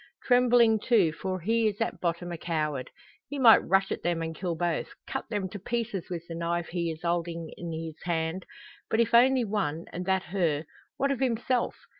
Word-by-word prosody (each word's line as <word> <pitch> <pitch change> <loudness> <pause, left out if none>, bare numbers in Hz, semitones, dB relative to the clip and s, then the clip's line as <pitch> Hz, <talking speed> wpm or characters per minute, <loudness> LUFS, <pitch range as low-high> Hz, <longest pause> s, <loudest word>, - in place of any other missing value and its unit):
Trembling, 245 -3 +5
too; 205 -7 +3
for 185 +3 -3
he 225 +4 +2
is 210 -1 -2
at 225 - -2
bottom 175 0 -2
a 170 - -4
coward. 150 -6 -2 0.4
He 285 - -5
might 240 -4 +8
rush 195 0 +1
at - - -2
them 170 -1 -1
and 160 0 -4
kill 175 0 -2
both 170 -1 -1 0.2
cut - - -5
them 205 -4 -2
to 205 - -7
pieces 230 -2 -3
with 170 -2 -5
the 165 - -6
knife 170 0 -2
he 170 -1 -1
is 160 +1 -7
holding 170 -1 -2
in 170 -1 -6
his 160 -1 -6
hand. 170 +1 -2 0.4
But 220 - +1
if 230 0 +2
only 250 +1 +5
one, 190 -6 -2
and 180 - -3
that 190 0 +2
her, 165 -5 +1 0.3
what 275 0 +1
of 275 - -1
himself! 245 -1 0
180 Hz, 200 wpm, -28 LUFS, 165-225 Hz, 0.4 s, might